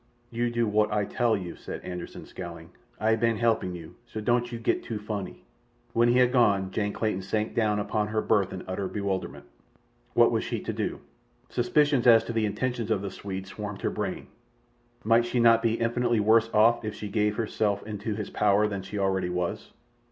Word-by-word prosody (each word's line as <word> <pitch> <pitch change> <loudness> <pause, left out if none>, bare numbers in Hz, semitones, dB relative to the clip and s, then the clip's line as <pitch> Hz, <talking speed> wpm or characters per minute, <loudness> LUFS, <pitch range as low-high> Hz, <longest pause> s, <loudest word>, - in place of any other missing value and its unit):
"You 120 +1 0
do 120 0 0
wot 105 0 +2
Ay 105 -1 +1
tal 115 -1 +1
you," 90 -3 -6
said - - -7
Anderssen, 90 -1 -7
scowling. 85 -2 -9 0.3
"Ay 110 +1 +3
ban 115 0 +1
halpin' 110 -6 +1
you, 80 -2 -10
so 110 - -6
don't 120 +2 +1
you 120 - -4
gat 115 - 0
too 115 - -5
fonny." 105 -2 -6 0.5
When 120 +1 +4
he 120 - +4
had 125 -1 +4
gone 100 -7 +3
Jane 105 +1 -1
Clayton 110 -4 -1
sank 105 +3 -2
down 105 -2 +1
upon 105 +1 -1
her 110 +1 -1
berth 100 -4 +2
in 95 - -6
utter 95 +1 -3
bewilderment. 100 -1 -3 0.7
What - - +6
was - - 0
she - - -3
to - - -4
do? - - -3 0.5
Suspicions 140 +1 +2
as 115 -2 +7
to 115 - -5
the 110 -1 +1
intentions 115 +2 -2
of 105 -3 0
the 100 - -4
Swede 95 -1 -6
swarmed 105 0 -7
her - - +1
brain. - - -4 0.8
Might 115 +1 +4
she 120 - 0
not 115 -1 +6
be 115 -1 +1
infinitely 120 0 +1
worse 110 +2 +4
off 115 +2 +4
if 105 -1 -4
she 105 - -6
gave 105 0 0
herself 105 -2 -1
into 105 0 -4
his 105 -1 -5
power 105 0 +3
than 100 -2 -4
she 100 +2 -7
already 95 -2 0
was? 90 -1 -3
105 Hz, 200 wpm, -27 LUFS, 100-115 Hz, 0.8 s, as